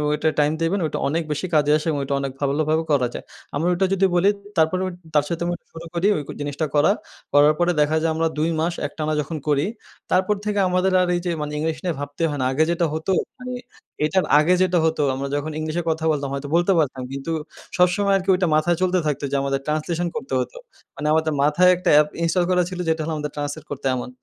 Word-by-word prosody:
এটা 155 +1 +1
টাইম 150 +1 +3
দেবেন 180 +5 +1
ওটা - - -4
অনেক 165 +3 0
বেশি 150 +5 -2
কাজে 150 0 +3
আসে 155 - -5
এবং 145 -2 0
ওইটা 140 +1 -1
অনেক 135 -1 -3
ভালোভাবে 155 +3 +1
করা 130 -4 +3
যায় - - -6 0.3
আমরা 160 +5 0
ওটা 190 +2 +1
যদি 195 0 +3
বলি 190 +3 +4 0.3
তারপরে 160 +4 +2 0.3
তার 145 0 +4
সাথে 170 0 -2
আমি 175 - -1 0.2
শুরু 165 +1 -9
করি 180 +4 +2
ওই - - -2 0.2
জিনিসটা 145 +2 -2
করা, 150 +7 +5 0.4
করার 145 +1 +6
পরে 175 0 +3
দেখা 150 +2 +2
যায় 165 0 +1
আমরা 165 0 +1
২ 160 +2 +1
মাস 170 +1 0
একটানা 155 +1 -3
যখন 155 +2 -5
করি 145 0 +2 0.5
তারপর 190 +3 +3
থেকে 205 -1 0
আমাদের 185 +1 +2
আর 180 - +1
এই - - 0
যে, - - 0
মানে 150 0 -3
ইংলিশ 160 0 -1
নিয়ে 175 -3 -1
ভাবতে 145 +3 -4
হয় 145 - -3
না। - - +1
আগে 155 +4 +3
যেটা 170 0 +1
হতো 160 +4 -2 0.3
মানে 250 0 -6 0.5
এটার 185 +4 +1
আগে 170 +4 +3
যেটা 180 -1 +3
হতো 160 -2 +1
আমরা 140 +1 -3
যখন 150 +2 -2
ইংলিশে 160 +2 -2
কথা 160 0 -1
বলতাম, 140 -2 -2
হয়তো 140 +1 -4
বলতে 175 +3 +3
পারতাম 135 -3 -1
কিন্তু 140 +4 -4 0.5
সবসময় 180 +3 +3
আরকি 190 +1 -4
ওইটা 180 -1 +1
মাথায় 160 +2 +2
চলতে 185 0 +2
থাকতো 145 -1 -2
যে, - - 0
আমাদের 135 0 0
ট্রান্সলেশন 165 +3 -1
করতে 235 +3 -5
হতো। - - -4 0.4
মানে 150 - -3
আমাদের 160 -1 +1
মাথায় 175 +5 +4
একটা 180 -1 -1
অ্যাপ 150 0 +6 0.2
ইনস্টল 170 +2 +2
করা 180 0 +3
ছিল 180 - -6
যেটা 160 0 +1
হল 160 - -3
আমাদের 150 -1 -4
ট্রান্সলেট 145 +1 -4
করতে 140 -1 -6
এমন। 125 - -4
160 Hz, 225 wpm, -22 LUFS, 150-175 Hz, 0.5 s, করার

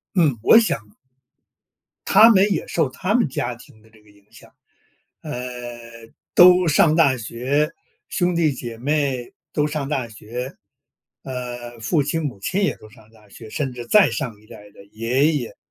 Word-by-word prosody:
嗯， 150 -9 +3
我 230 - +7
想 105 - -3 1.1
他 225 - +7
们 200 -3 +5
也 190 - -1
受 160 -6 0
他 185 +9 -2
们 240 - +2
家 125 -2 -3
庭 110 -2 -18
的 110 - -23
这 110 -1 -22
个 105 - -24
影 100 -1 -24
响， - - -17 0.7
呃， 150 - -7 1.0
都 180 0 +7
上 155 +1 +4
大 140 -6 +4
学， 130 +7 -1 0.4
兄 175 -1 0
弟 165 -3 +2
姐 120 -2 -7
妹 135 -2 -2 0.2
都 150 -1 +1
上 150 -2 -4
大 130 -5 -2
学， 120 +4 -7 0.7
呃， 120 -2 -7
父 145 +7 +1
亲 160 +3 -2
母 125 -9 -5
亲 190 - -1
也 - - 0
都 110 - -15
上 110 +1 -20
大 105 -2 -22
学， 110 +2 -12
甚 135 0 -3
至 120 -1 -8
再 210 -3 +5
上 120 -9 -4
一 110 - -22
代 105 -1 -13
的 100 - -16
爷 125 +9 0
爷， 120 -6 -4
130 Hz, 185 characters per minute, -21 LUFS, 115-155 Hz, 1.1 s, 我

